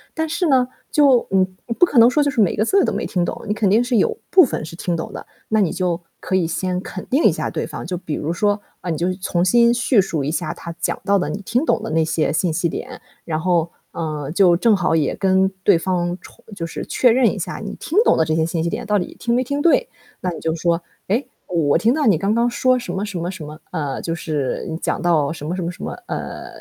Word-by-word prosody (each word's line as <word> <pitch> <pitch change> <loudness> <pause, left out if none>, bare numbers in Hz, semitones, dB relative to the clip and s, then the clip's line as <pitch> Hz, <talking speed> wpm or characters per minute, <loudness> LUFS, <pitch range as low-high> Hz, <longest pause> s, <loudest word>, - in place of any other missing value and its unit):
但 320 0 -1
是 340 +3 -1
呢， 255 -4 +3 0.2
就 275 -5 +4
嗯， 185 -1 +1
你 230 - -3
不 355 - +5
可 280 -8 +3
能 230 +1 +8
说 295 +3 +2
就 285 - +1
是 240 - +1
每 195 - +2
个 215 +1 +1
字 395 +9 +3
都 - - +1
没 - - -2
听 180 -2 0
懂， - - -3
你 210 - +1
肯 215 -2 +1
定 220 +5 +4
是 245 -1 +1
有 450 - +1
部 370 - +8
分 225 - -2
是 165 - -9
听 175 0 -2
懂 160 - -6
的。 - - -8 0.2
那 220 -1 +3
你 185 - +1
就 180 -2 -1 0.2
可 190 - -2
以 180 -3 +2
先 180 +2 -2
肯 185 - -7
定 275 +5 +2
一 - - +6
下 - - -3
对 - - -3
方， - - -7
就 180 0 -3
比 160 -4 -4
如 155 +3 -2
说， 205 +3 +1 0.2
嗯， 175 - -3
你 - - -3
就 175 +3 0
重 180 -2 -1
新 235 +4 +5
叙 240 -3 +3
述 165 -7 -2
一 150 - -1
下 160 - -2
他 170 -1 -8
讲 - - -1
到 200 0 +3
的 180 - -1
你 200 - -4
听 240 +7 0
懂 - - +1
的 - - -5
那 160 0 +2
些 155 -2 0
信 170 +1 +1
息 170 +2 0
点， - - -6 0.2
然 155 -2 -2
后， 170 -1 +1 0.2
嗯， 150 -3 -4
就 175 -2 +5
正 225 +2 +4
好 185 -4 0
也 155 -3 +1
跟 190 0 +3 0.2
对 200 -4 +5
方 175 0 -1
重 240 - -17
就 165 - -4
是 165 - -6
确 250 - +3
认 250 +2 +3
一 - - -6
下 - - -4
你 - - -5
听 335 - -3
懂 - - +4
的 160 - +3
这 155 0 0
些 160 0 +2
信 165 0 -2
息 170 - 0
点 - - -4
到 210 0 +2
底 180 - -5
听 235 - 0
没 255 - +2
听 285 +3 -2
对。 345 +10 +3 0.3
那 180 - -1
你 - - -7
就 160 - 0
说： 170 +1 0 0.3
“诶， 230 +8 0 0.2
我 160 -5 +2
听 235 +3 +3
到 305 -1 0
你 195 - +5
刚 195 +6 0
刚 235 +1 +2
说 255 +1 +2
什 240 -7 -5
么 195 +2 -2
什 200 -4 -5
么 170 +1 -3
什 160 -5 -8
么。 150 +1 -10
嗯， 145 -6 -3
就 165 - -3
是， 150 -5 -3
你 160 - -3
讲 - - -2
到 160 -5 +2
什 150 -2 -7
么 175 - -2
什 185 - -3
么 170 0 -2
什 180 - -13
么， - - -3 0.2
呃， - - -5
185 Hz, 295 characters per minute, -20 LUFS, 165-235 Hz, 0.3 s, 能